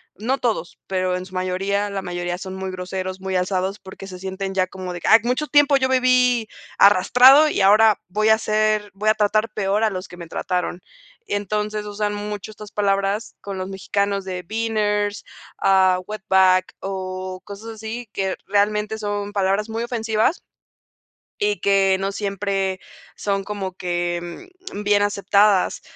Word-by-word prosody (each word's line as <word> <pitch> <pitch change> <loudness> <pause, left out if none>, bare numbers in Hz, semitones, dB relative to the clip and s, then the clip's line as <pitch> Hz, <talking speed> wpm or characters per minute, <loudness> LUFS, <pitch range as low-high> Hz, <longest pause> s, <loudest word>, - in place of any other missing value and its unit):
no 250 +6 -1
todos, 220 -8 -2
pero 185 -1 0
en 180 - -6
su 185 - -17
mayoría, 195 +3 -1
la 195 -1 -3
mayoría 175 0 -3
son 190 0 -7
muy 190 0 -4
groseros, 185 +1 -5
muy 190 -1 -3
alzados 185 +2 -1
porque 190 0 -11
se 185 -1 -8
sienten 190 +1 -4
ya 185 -1 +3
como 185 -1 -7
de 175 - -7
que: - - -3
"Ay, 225 - +8
mucho 250 +5 0
tiempo 290 -1 +5
yo 260 -1 0
viví 250 -2 +3 0.3
arrastrado 250 +10 +7
y 200 - -1
ahora 210 +2 +5
voy 215 +3 +1
a 220 - +7
hacer 215 -1 0
voy 210 +2 0
a - - +6
tratar 215 +1 +1
peor 205 +1 0
a 220 - +2
los 185 0 -5
que 175 - -12
me 170 -1 -9
trataron". 180 +1 -3 0.5
Entonces 210 +1 -2
usan 205 0 -2
mucho 205 0 -5
estas 210 -1 -11
palabras 200 +1 0
con 200 -1 -6
los 185 0 -4
mexicanos 200 0 -1
de 185 -1 -4
beaners, 210 -1 -1 0.4
ah, 190 -1 +4
wetback 190 -3 +2
o 185 -1 -5
cosas 205 +3 -9
así 220 +2 -7
que 190 -1 -1
realmente 210 +2 +1
son 205 -1 -3
palabras 200 +1 0
muy 225 +1 -3
ofensivas, 225 +4 0 1.0
y 415 0 0
que 195 -1 +3
no 195 +1 -1
siempre 195 -1 -2 0.4
son 195 -1 -1
como 195 -2 -5
que, 175 - -4 0.2
mm, 205 - -5
bien 205 0 +3
aceptadas. 200 -1 +2
200 Hz, 165 wpm, -22 LUFS, 190-215 Hz, 1.0 s, Ay